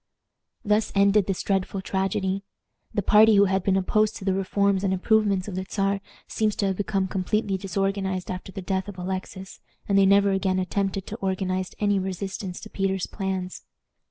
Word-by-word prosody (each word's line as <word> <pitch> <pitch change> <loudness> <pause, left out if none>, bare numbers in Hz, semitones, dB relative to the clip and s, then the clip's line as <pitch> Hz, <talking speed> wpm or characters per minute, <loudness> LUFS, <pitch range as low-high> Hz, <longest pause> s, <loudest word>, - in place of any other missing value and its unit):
Thus 210 +1 +2
ended 200 0 +4
this 195 -2 -2
dreadful 195 0 -1
tragedy. 190 0 -1 0.5
The 205 - -1
party 215 +2 +6
who 200 0 +6
had 190 0 +1
been 190 +1 +2
opposed 215 +3 +1
to 195 - -8
the 195 - +2
reforms 195 0 +1
and 195 - +1
improvements 200 -1 +2
of 205 - -5
the 185 +1 -3
Czar 195 -1 0 0.3
seems 215 -1 0
to 200 - 0
have 190 -1 0
become 195 -2 0
completely 195 +2 -1
disorganized 195 -1 -2
after 185 +1 -6
the 195 -1 -7
death 190 +1 -1
of 205 -2 -8
Alexis, 190 +1 -6 0.3
and 195 -1 +3
they 195 - +5
never 200 0 +5
again 190 -1 +1
attempted 195 +1 -1
to 220 - -6
organize 185 -2 -2
any 205 -1 +2
resistance 190 0 -4
to 220 - -9
Peter's 195 -1 -1
plans. 190 -2 -4
195 Hz, 180 wpm, -25 LUFS, 190-200 Hz, 0.5 s, party